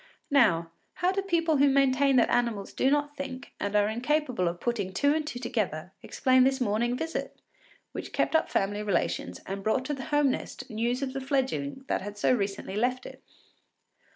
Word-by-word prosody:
Now, 170 -12 +3 0.2
how 360 +1 +1
do 390 +1 -1
people 335 -5 +1
who 280 +1 +5
maintain 275 0 +3
that 240 - +4
animals 235 -5 0
do 265 - +2
not 290 0 0
think 270 -1 -7
and 200 +1 -2
are 205 0 +4
incapable 250 - 0
of 170 +1 -3
putting 205 -6 -2
two 285 +6 +3
and 310 -1 -1
two 245 - -4
together 205 -9 -2
explain 260 -1 +3
this 265 +1 +2
morning 240 +1 0
visit, 325 +3 -4 0.5
which - - -6
kept - - 0
up 320 - +3
family 205 +1 0
relations 210 -2 -1
and 195 +1 -5
brought 220 +6 0
to 295 - -2
the 270 -2 -5
home 290 -2 +3
nest - - -6
news 240 +4 -1
of 260 -1 -3
the 270 - -3
fledgeling 270 0 -1
that - - 0
had 205 +1 -7
so 205 - +3
recently 200 -3 -2
left 250 +3 0
it? - - -10
255 Hz, 190 wpm, -28 LUFS, 210-280 Hz, 0.5 s, who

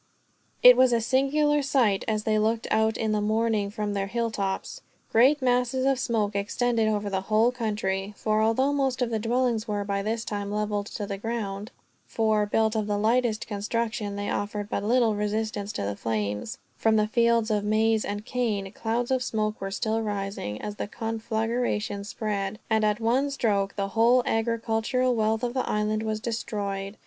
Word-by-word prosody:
It 250 0 +10
was 255 0 +4
a 235 - +3
singular 280 +5 +2
sight, 245 -8 +2
as 215 -1 0
they 215 -1 +2
looked 225 +1 0
out 220 0 +2
in 220 -1 -1
the 210 -1 +1
morning 215 -1 +1
from 210 0 -3
their 195 -1 -1
hilltops. 225 - -3 0.3
Great 265 +5 +4
masses 250 +1 +1
of 270 -1 +2
smoke 215 -5 0
extended 225 +3 0
over 210 -1 0
the 190 -1 -1
whole 220 +4 +3
country; 205 -4 -2
for 215 0 +1
although 260 +6 +2
most 265 -3 0
of 235 - -2
the 220 - 0
dwellings 235 0 0
were, 205 -1 -1
by 200 0 -2
this 225 +3 -2
time, 205 -1 -4
leveled 210 -1 -1
to 210 - -5
the 200 -1 -5
ground 210 -2 -4 0.4
for, 215 -2 +1
built 220 +1 +1
of 215 -1 -1
the 205 -1 0
lightest 225 +1 +1
construction, 215 0 -2
they 205 0 -3
offered 205 0 -3
but 200 - -1
little 230 0 +3
resistance 210 0 -2
to - - -3
the 100 0 -2
flames 105 - -3 0.2
from 225 -1 +3
the 215 -1 +3
fields 230 0 +2
of 210 -1 +1
maize 220 +1 +2
and 205 +1 -4
cane, 215 -6 -2
clouds 235 +4 -2
of 260 -1 +2
smoke 215 -3 -2
were 195 - -3
still 220 +3 -1
rising, 195 - -4
as 210 0 -6
the - - -3
conflagration 225 -1 -2
spread; 205 -2 -3
and 220 0 +3
at 210 +1 +1
one 250 +5 +1
stroke 205 -7 0
the 195 -1 -2
whole 235 +4 +4
agricultural 230 +2 0
wealth 220 0 0
of 240 -1 -1
the 260 - -1
island 210 0 0
was 220 -1 -2
destroyed. 205 -3 -4
220 Hz, 180 wpm, -26 LUFS, 205-235 Hz, 0.4 s, It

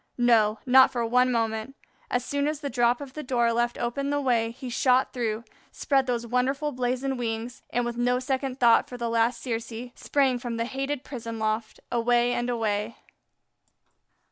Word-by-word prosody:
No, 225 -3 +4
not 260 0 +7
for 240 -2 -1
one 250 +2 +3
moment. 225 +2 -1 0.3
As 245 0 -1
soon 285 0 -1
as 305 -1 -2
the 280 -2 -4
drop 240 +1 +2
of 275 -2 -8
the 305 - -5
door 240 -4 +1
left 240 +1 0
open 275 +4 -2
the 290 0 +1
way, 240 -5 +1
he 255 +3 -8
shot 255 +1 +2
through, 225 -3 -2
he 220 - -30 0.2
spread 270 -2 +1
those 240 -1 -1
wonderful 265 +5 0
blazoned 255 +1 -2
wings, 230 +1 -4
and, 245 0 0
with 240 0 -4
no 245 +1 +2
second 265 +1 -2
thought 235 -2 +5
for 245 - -7
the 235 -1 -2
latest 230 +1 +1
Circe, 230 0 -4
sprang 270 -3 +1
from 240 -2 -4
the 230 - -1
hated 270 +2 -3
prison 230 -4 -6
loft 220 0 -2
away 240 0 +2
and 240 0 -1
away. 220 -2 -1
245 Hz, 185 wpm, -26 LUFS, 230-260 Hz, 0.3 s, not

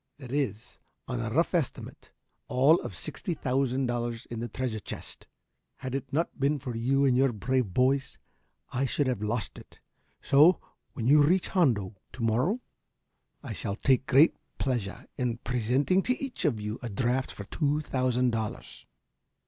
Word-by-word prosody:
"There 130 -3 -9
is, 125 -6 -2 0.3
on 125 -1 -3
a 115 -1 -2
rough 165 +11 +1
estimate, 165 -7 -3 0.4
all 135 +7 +4
of - - -6
sixty 180 -5 -4
thousand 130 -1 0
dollars 120 -1 -2
in 115 - -4
the 120 - -3
treasure 120 -1 -3
chest. - - -8 0.5
Had 130 -1 -6
it 135 0 -4
not 165 +4 -1
been 140 +2 +2
for 125 -3 -5
you 135 +5 +2
and 130 -2 +4
your 135 0 +4
brave 125 0 0
boys 130 +5 +1 0.5
I 130 +3 0
should 140 +2 0
have 125 -6 -1
lost 105 +2 -2
it. - - -17 0.4
So, 155 +6 +5 0.3
when 115 - -4
you 145 +4 +6
reach 175 +5 +3
Hondo 110 - +1 0.2
to 125 - -5
morrow, 125 - +1 0.8
I - - -5
shall 100 - -4
take 130 +3 +2
great 140 +4 +6 0.2
pleasure 120 -7 -2
in 125 -2 0
presenting 125 - +1
to 250 +5 0
each 270 -8 -4
of 125 -8 +1
you 105 +2 -4
a 120 - -4
draft 125 +4 0
for 100 - -7
two 145 +7 0
thousand 125 -3 +1
dollars." 110 -2 -5
130 Hz, 165 wpm, -28 LUFS, 115-140 Hz, 0.8 s, you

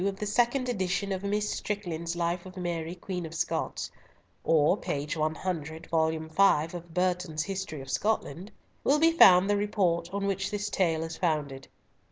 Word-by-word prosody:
of 195 -1 -2
the 210 - -3
second 240 +5 +1
edition 195 -3 -1
of 190 -1 -2
Miss 205 +1 -1
Strickland's 175 -6 -3
Life 175 +1 -1
of 185 0 -12
Mary 170 -1 -3
Queen 180 0 -5
of 160 0 -7
Scots, - - -2 0.5
or 155 -2 +4
p. 140 0 -3
100, 160 0 -3
vol. 160 -1 +3
v. 160 +1 +2
of 170 -1 -8
Burton's 180 -3 0
History 190 -7 -4
of 135 0 -8
Scotland, 205 -3 -1 0.3
will 285 - +4
be 325 +2 +5
found 190 - +7
the 205 0 +2
report 180 -5 0
on 200 0 -2
which 195 0 -1
this 205 0 -3
tale 165 -4 +1
is 165 0 -6
founded. 150 -6 -1
180 Hz, 170 wpm, -28 LUFS, 160-200 Hz, 0.5 s, found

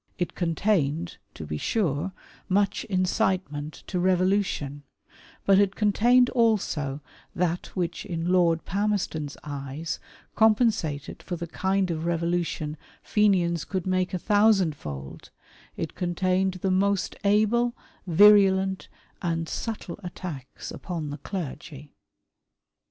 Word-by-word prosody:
It 175 -1 -2
contained, 165 -2 0 0.2
to 80 - -7
be 75 0 -4
sure, 180 -4 0 0.4
much 200 +1 +1
incitement 185 -5 -1
to 180 - -2
revolution; 185 -6 +1 0.6
but 195 0 +6
it 200 -1 +2
contained 240 +4 +4
also 180 - +1 0.3
that 175 0 -1
which 175 -2 -2
in 170 -3 -3
Lord 170 -3 +3
Palmerston' 200 -6 -1
s 145 - -9
eyes 145 +2 -5 0.3
compensated 215 - +2
for 180 - -4
the 170 0 -5
kind 190 +2 0
of 160 0 -3
revolution 170 -2 -1 0.3
Fenians 180 -6 +2
could 185 -3 -3
make 185 -1 0
a 185 - -1
tJiousand 205 -3 +3
fold 70 - -8 0.2
— - - -27
it - - -4
contained 185 +1 0
the 185 +1 -1
most 195 +1 +1
able, 220 +4 +3 0.3
virulent, 190 +1 +5 0.3
and 165 -1 -1
subtle 215 -4 -5
attacks 170 -7 -7
upon 165 -5 -5
the 145 - -6
clergy. 150 -5 -7
180 Hz, 120 wpm, -26 LUFS, 160-200 Hz, 0.6 s, but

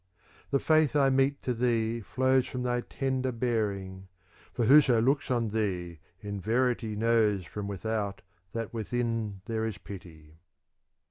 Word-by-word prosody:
The 140 - +3
faith 155 0 +3
I 135 -2 +4
mete 135 +1 +1
to 125 - 0
thee 115 -1 0
flows 130 +3 +1
from 125 -1 -4
thy 120 0 0
tender 130 0 -2
bear 115 -3 0
ing; 95 -1 -8 0.4
for 120 - -1
whoso 135 -2 +6
looks 135 +5 +1
on 120 -3 +1
thee, 90 -6 -2 0.2
in 100 -1 -5
verity 115 0 0
knows 110 -4 +2
from 100 +4 -6
without 100 0 -3 0.3
that 115 -1 -4
within 115 -3 -2
there 110 0 -2
is 110 -2 -3
pity. 80 -5 -12
115 Hz, 145 wpm, -29 LUFS, 100-125 Hz, 0.4 s, whoso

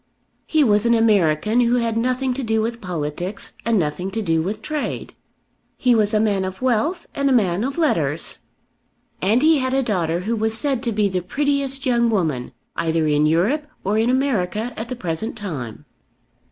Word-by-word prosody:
He 310 -2 +3
was 210 -2 +3
an 235 - +4
American 215 -1 +3
who 240 0 +3
had 230 -2 0
nothing 255 +2 0
to 270 - -3
do 225 -2 0
with 230 +2 -2
politics 175 +2 -4
and 230 -1 +2
nothing 175 +2 -1
to 220 +3 -3
do 165 -4 +1
with 210 +5 -4
trade. 305 -2 -4 0.6
He 250 -1 +3
was 215 -2 +3
a 215 - +3
man 205 -3 +1
of 190 0 -5
wealth 260 - 0
and 280 0 +1
a - - +2
man 200 -5 +2
of 270 +4 -3
letters. 320 -2 +1 0.8
And 220 +8 +3
he 315 -1 +5
had 260 0 0
a 270 - +2
daughter 175 -6 -1
who 220 +5 -1
was 220 0 +1
said 265 0 0
to 240 -2 -1
be 210 -1 +2
the 185 -2 -2
prettiest 275 +5 -1
young 235 -2 +2
woman 160 - -1 0.2
either 160 -1 0
in 150 0 +3
Europe 215 - +1 0.2
or 205 +3 +1
in 225 +2 +2
America 240 -4 0
at 225 +2 -6
the 255 - -3
present 185 +1 -3
time. 145 - -6
220 Hz, 190 wpm, -21 LUFS, 185-255 Hz, 0.8 s, he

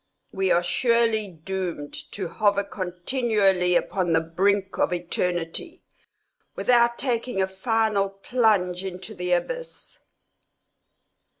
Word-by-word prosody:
We 190 0 0
are 175 0 +3
surely 230 +2 +2
doomed 175 -3 -5 0.2
to 190 -3 -4
hover 200 +3 +1
continually 190 -1 +1
upon 180 -2 +1
the 160 - +5
brink 190 +4 0
of - - +2
eternity, 175 - -3 0.7
without 235 -1 +3
taking 245 -4 -1
a 190 - +3
final 205 0 0
plunge 195 -3 +1
into 190 +2 -7
the 180 -2 -1
abyss. - - -4
195 Hz, 105 wpm, -25 LUFS, 180-225 Hz, 0.7 s, the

